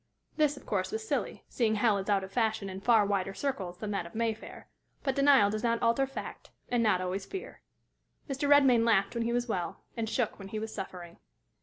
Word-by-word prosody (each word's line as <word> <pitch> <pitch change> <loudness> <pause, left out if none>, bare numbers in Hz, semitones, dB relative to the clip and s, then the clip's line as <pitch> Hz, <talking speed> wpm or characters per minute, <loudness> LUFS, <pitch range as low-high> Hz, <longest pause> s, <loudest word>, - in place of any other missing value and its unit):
This, 300 -2 +2
of - - -13
course, - - -1
was 440 0 -4
silly, - - -2
seeing 220 -3 +1
hell 210 -1 +3
is 195 - -5
out 200 -1 +2
of 190 - -8
fashion 220 -3 0
in 190 +1 -7
far 220 -1 +4
wider 195 -1 -1
circles 190 -11 -3
than 210 +1 -4
that 195 -4 -2
of 170 - -15
Mayfair; 225 -1 -3 0.4
but 270 - +1
denial 275 -7 +5
does 215 0 -2
not 230 -1 +1
alter 235 +4 +2
fact, 270 - -8 0.2
and 245 -1 +2
not 210 -5 +3
always 185 +2 -3
fear. 385 - -7 0.7
Mr. 280 0 -2
Redmain 270 -5 +6
laughed 200 -4 +3
when 235 -1 -1
he 235 - 0
was 245 +1 0
well, 180 -6 -3
and 225 -2 -2
shook 230 -2 -1
when 195 - -8
he 215 - -5
was 220 0 -4
suffering. 180 -3 -7
220 Hz, 215 wpm, -30 LUFS, 195-245 Hz, 0.7 s, Redmain